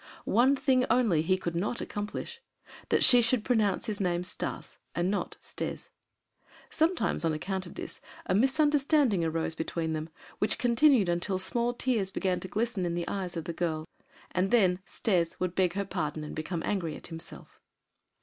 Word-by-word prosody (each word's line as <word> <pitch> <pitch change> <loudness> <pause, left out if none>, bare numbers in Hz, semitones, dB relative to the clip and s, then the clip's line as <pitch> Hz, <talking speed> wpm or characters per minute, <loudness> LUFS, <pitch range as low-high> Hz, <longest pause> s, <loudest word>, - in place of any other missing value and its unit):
One 250 +6 +4
thing 260 -2 +2
only 220 -11 +3
he 185 +4 +2
could 170 -2 -4
not 205 +7 -1
accomplish, 210 - -5 0.5
that - - +3
she 245 -1 +8
should 230 -1 +1
pronounce 215 -6 +1
his 210 -2 -3
name 175 -2 0
Stas, 180 - -5 0.2
and 175 +2 +1
not 205 - -3
"Stes." - - -5 0.8
Sometimes, 325 - +1
on 165 -1 +1
account 190 +4 -3
of - - -12
this, - - -6 0.2
a - - 0
misunderstanding 275 - +3
arose 165 0 -1
between 160 0 -2
them, 155 +1 -4 0.3
which 210 - +1
continued 245 -3 +4
until 175 +2 0
small 235 +6 -1
tears 230 -7 +1
began 185 -2 0
to - - -7
glisten 215 0 -1
in 170 -1 -1
the 170 -1 -3
eyes 185 -3 -3
of 165 - -3
the 170 - -4
girl. 160 -2 -2 0.5
Then 185 -1 +3
"Stes" 175 -7 0
would 180 -1 -1
beg 180 -2 +2
her 200 0 -2
pardon 155 -5 -3
and 150 - -7
became 165 +2 -3
angry 175 -6 -1
at - - -11
himself. 165 - -10
190 Hz, 170 wpm, -29 LUFS, 170-240 Hz, 0.8 s, she